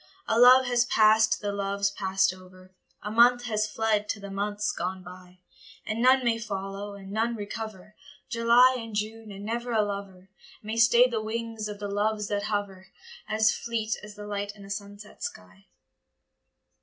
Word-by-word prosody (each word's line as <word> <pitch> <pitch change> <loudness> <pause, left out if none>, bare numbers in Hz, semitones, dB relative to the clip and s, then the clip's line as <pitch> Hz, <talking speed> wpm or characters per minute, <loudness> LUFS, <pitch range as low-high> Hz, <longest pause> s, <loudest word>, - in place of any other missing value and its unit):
A 225 - +2
love 255 +1 +8
has 245 -1 +2
passed 215 -1 +4
to - - -4
the 205 -1 -2
loves 200 0 -1
passed 195 -2 +1
over, 185 0 -16 0.3
A 210 - -4
month 240 +2 +5
has 215 -3 -1
fled 215 -1 0
to 220 - -2
the 200 0 -8
months 205 +1 -2
gone 185 +1 -4
by; 180 0 -13 0.4
And 220 +2 -3
none 260 +1 +5
may 230 -1 +1
follow, 200 -1 -5
and 195 -1 -11
none 225 +3 0
recover 210 -1 -7 0.3
July 240 +2 +4
and 225 -2 -8
June, 215 +1 -4
and 200 +1 -9
never 235 +2 -3
a 220 -2 +3
lover 195 -2 -7 0.3
May 220 +2 -4
stay 235 +2 +6
the 230 -3 -2
wings 225 0 -4
of 210 -1 -7
the 205 0 -5
Loves 210 +1 -1
that 205 0 -1
hover, 200 -3 -3 0.4
As 215 0 +3
fleet 225 -2 -2
as 210 0 -11
the 205 0 -9
light 205 0 -4
in 200 -1 -13
a 200 - -9
sunset 205 0 -8
sky. 90 +1 -8
210 Hz, 180 wpm, -27 LUFS, 200-225 Hz, 0.4 s, love